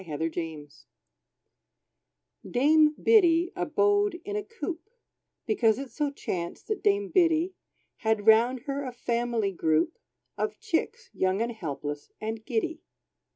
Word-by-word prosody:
=Dame 160 -5 -6
Biddy= 160 -2 -4 1.8
Dame 300 +4 +4
Biddy 350 -5 +4
abode 410 -3 +1
in 410 +1 -4
a 420 - 0
coop, 410 -3 -6 0.6
Because 225 - +2
it 275 -1 -6
so 295 -2 -1
chanced 175 - -5
that 430 - -1
dame 405 -1 +2
Biddy 340 0 +3 0.4
Had 220 -2 0
round 230 +3 +5
her 280 +1 -3
a 255 -2 -5
family 235 -3 -1
group 160 - 0 0.4
Of - - -2
chicks, 450 +4 -2
young, 190 +1 +1
and 235 +1 0
helpless, 145 -8 -5
and 220 0 -4
giddy. 275 +7 -2
270 Hz, 125 wpm, -28 LUFS, 220-355 Hz, 1.8 s, round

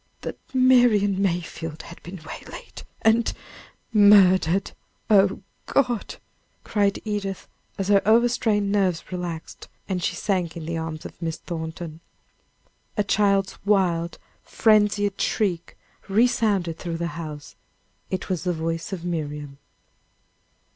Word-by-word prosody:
"That - - -6
Marian 245 -7 +4
Mayfield 170 -4 -2
had 170 - -12
been 180 +2 -9
waylaid, 160 - -9 0.2
and 225 +1 +4 0.4
" - - -36
"Murdered! 195 -3 +5 0.4
Oh, 195 -1 +4 0.2
God!" 245 -5 0 0.5
cried 200 -2 +1
Edith, 200 -3 -3 0.3
as 195 0 -2
her 200 -1 +5
over 230 +3 +5
strained 210 -4 +1
nerves 190 -5 0
relaxed, 175 -3 -6 0.2
and 185 -2 -2
she 175 - -1
sank 175 -4 -1
in 160 - -6
the 165 +1 -3
arms 160 -1 -5
of - - -10
Miss 165 -1 -2
Thornton. 160 -1 -6 1.0
A 210 - +3
child's 200 -1 +1
wild, 180 -4 +1 0.2
frenzied 210 -2 +2
shriek 180 -6 -1 0.3
resounded 205 -6 +2
through 170 -2 -4
the 170 0 -2
house. 150 -3 -7 0.5
It 185 - -3
was 180 -4 -2
the 180 -1 0
voice 165 +2 -3
of 180 -3 -5
Miriam. 150 -4 -4
190 Hz, 125 wpm, -24 LUFS, 165-205 Hz, 1.0 s, Murdered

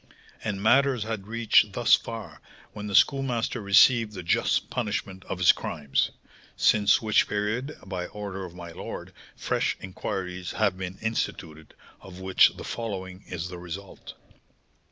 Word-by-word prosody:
And 100 -2 -3
matters 130 0 +4
had 110 -3 -5
reached 115 0 +3
thus - - +3
far - - -1 0.3
when 105 -1 -6
the 100 - -2
Schoolmaster 125 -3 +2
received 105 +2 +5
the 90 -3 -7
just 85 - +1
punishment 105 -5 -3
of - - -4
his 90 -1 +7
crimes; 70 -2 -1 0.5
since 105 0 +4
which 110 -1 +3
period, 110 +8 -2
by 90 -2 -4
order 100 -2 -6
of 90 -1 -9
my 85 -1 -8
lord, - - -8 0.2
fresh - - -1
inquiries 90 -1 -5
have 105 -4 +1
been 95 0 -6
instituted, 80 -8 -4 0.2
of 95 -1 -12
which 95 0 +5
the - - -7
following 95 -5 -5
is 90 0 -5
the 90 -1 -8
result. 90 +3 -9
100 Hz, 145 wpm, -26 LUFS, 90-110 Hz, 0.5 s, his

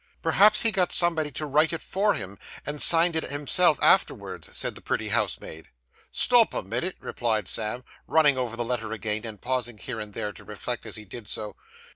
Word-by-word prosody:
'Perhaps 210 +1 +4
he 225 - +4
got 185 -3 0
somebody 165 -3 +3
to 150 +1 -5
write 150 +2 +2
it 165 - -5
for 200 +1 0
him, 95 +1 -7 0.3
and 145 0 -5
signed 165 0 +5
it 160 - 0
himself 145 +2 +2
afterwards,' - - +2
said - - -1
the - - -12
pretty - - -3
housemaid. 80 0 -2 0.4
'Stop 240 -2 +4
a - - -3
minit,' 120 - -4
replied 110 -5 -2
Sam, 115 +5 -2 0.2
running 150 -3 +4
over 125 -3 -3
the 120 - -2
letter 115 -2 -3
again, 110 +1 -3
and 105 -2 -9
pausing 125 -3 -3
here 115 +2 -6
and 105 -1 -8
there, 105 - -4
to - - -12
reflect, - - -6
as - - -3
he 110 - -7
did 105 +2 -10
so. 105 -1 -4
125 Hz, 195 wpm, -25 LUFS, 110-165 Hz, 0.4 s, signed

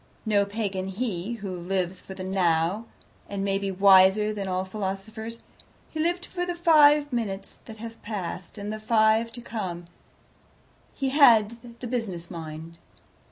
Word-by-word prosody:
No 205 -2 +3
Pagan 200 -2 -3
he, 200 0 -3
who 200 -5 -5
lives 180 +1 -2
for 190 - -10
the 185 - -6
Now, 185 +2 +1 0.4
and 200 -1 -3
may 195 0 +1
be 200 0 -2
wiser 195 +2 +5
than 200 -2 -4
all 185 0 -1
philosophers. 215 +4 -5 0.5
He 315 - -5
lived 350 +3 0
for 355 -1 -4
the 355 -1 -2
five 300 -4 +5
minutes 200 -5 -4
that 220 -1 -10
have 230 +1 -9
past, 185 -3 -6
and 205 +1 -4
the 215 - -5
five 220 +1 +3
to 240 - -7
come; 185 -7 -5 1.1
he 270 -1 -1
had 235 -3 +4
the - - -4
business 200 -9 -4
mind. 160 0 -8
205 Hz, 155 wpm, -26 LUFS, 190-230 Hz, 1.1 s, wiser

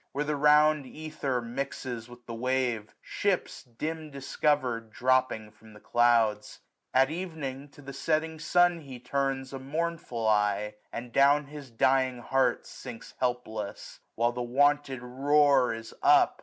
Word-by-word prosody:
Where 145 - -1
the 150 0 -1
round 150 0 +4
ether 145 -5 -3
mixes 120 -1 -5
with 120 0 -14
the 115 - -7
wave, 125 -2 0
945 - - -28
Ships, 200 -3 -1
dim«discover'd, 140 -3 -2
dropping 125 -2 +1
from 110 0 -18
the 105 - -14
clouds; 115 -3 +2 0.3
At 135 +2 +3
evening, 155 -6 -5
to 145 - -16
the 140 0 -8
setting 160 +3 -1
sun 175 +1 +3
he 135 -5 -10
turns 135 +1 -2
A 135 - -5
mournful 145 -5 -3
eye, 105 0 +1 0.2
and 120 +1 -6
down 145 +3 +4
his 145 -2 -10
dying 130 +2 +2
heart 135 +2 +1
Sinks 115 - -10
helpless; 110 -5 -3 0.2
while 120 +1 +2
the 125 +1 -5
wonted 135 +1 +1
roar 140 +1 +3
is 115 0 -7
up. - - +5
130 Hz, 140 wpm, -28 LUFS, 120-145 Hz, 0.3 s, up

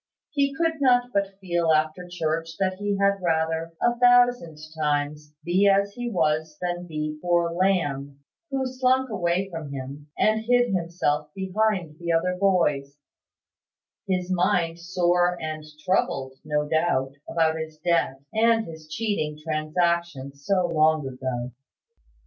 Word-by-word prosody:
He 280 -1 +1
could 325 -1 0
not 245 -2 +3
but 200 -1 -1
feel 175 -3 0
after 155 +3 +1
church 165 -1 -2
that 185 -1 -1
he 205 -1 -1
had 200 0 +2
rather, 160 -1 0
a 240 0 +1
thousand 245 -9 +4 0.2
times, 150 0 -2
be 185 +4 +3
as 200 0 +3
he 245 +1 -4
was 155 -5 0
than 175 0 -3
be 155 -1 -4
poor 175 -1 +2
Lamb, 145 -7 0 0.3
who 270 -1 -1
slunk 260 0 +1
away 180 -1 0
from 160 -4 -6
him, 140 +2 -7
and 220 +1 +2
hid 245 -1 +3
himself 165 -4 -1
behind 190 -4 -1
the 170 -1 -2
other 180 +2 +1
boys, 150 -8 +1 1.1
his 185 -1 -1
mind 175 -2 +1
sore 175 0 +1
and 155 -1 -5 0.2
troubled, 135 -7 0
no 150 0 -1
doubt, 155 -4 +1 0.2
about 160 -1 +1
his 160 -1 -6
debt, 165 -5 0
and 225 0 +3
his 160 -1 -10
cheating 155 -4 -2
transaction, 155 -2 -1
so 180 +7 0
long 155 -3 +2
ago. 130 -1 -4
170 Hz, 135 wpm, -25 LUFS, 155-195 Hz, 1.1 s, thousand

